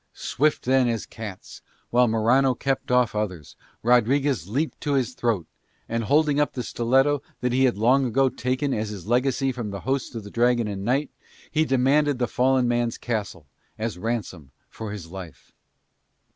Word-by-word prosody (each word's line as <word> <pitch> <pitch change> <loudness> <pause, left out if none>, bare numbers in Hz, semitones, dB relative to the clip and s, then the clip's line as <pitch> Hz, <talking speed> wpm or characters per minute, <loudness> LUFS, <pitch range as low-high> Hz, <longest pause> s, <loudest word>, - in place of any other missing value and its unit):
Swift 150 +3 0
then 130 0 +3
as 115 -3 -1
cats, 105 -5 -9 0.3
while 125 +1 +4
Morano 125 +4 +3
kept 135 +2 -2
off 125 -2 +3
others, 95 -8 -4 0.3
Rodriguez 125 - +2
leaped 145 +8 -2
to 145 -3 -1
his 130 -2 0
throat, 115 -9 -1 0.4
and, 115 0 -2
holding 145 +2 +3
up 150 - +1
the 125 - -3
stiletto 135 +5 +2 0.2
that 125 -1 0
he 130 +1 +4
had 120 -5 +1
long 130 +5 +3
ago 135 +3 +3
taken 130 +3 -1
as 110 0 -2
his 100 -5 -8
legacy 130 +3 +1
from 120 -4 -5
the 100 0 -6
host 130 0 -2
of 115 - -5
the 100 - -10
Dragon 120 -1 +2
and 100 -2 -4
Knight, 135 +6 0 0.4
he 155 +1 +2
demanded 140 +2 +2
the 120 -1 0
fallen 130 0 +2
man's 120 -1 0
castle 105 -9 -4 0.3
as 110 -4 -4
ransom 105 - -4 0.2
for 110 -2 -6
his 90 -6 -8
life. 90 -7 -10
120 Hz, 170 wpm, -24 LUFS, 110-135 Hz, 0.4 s, while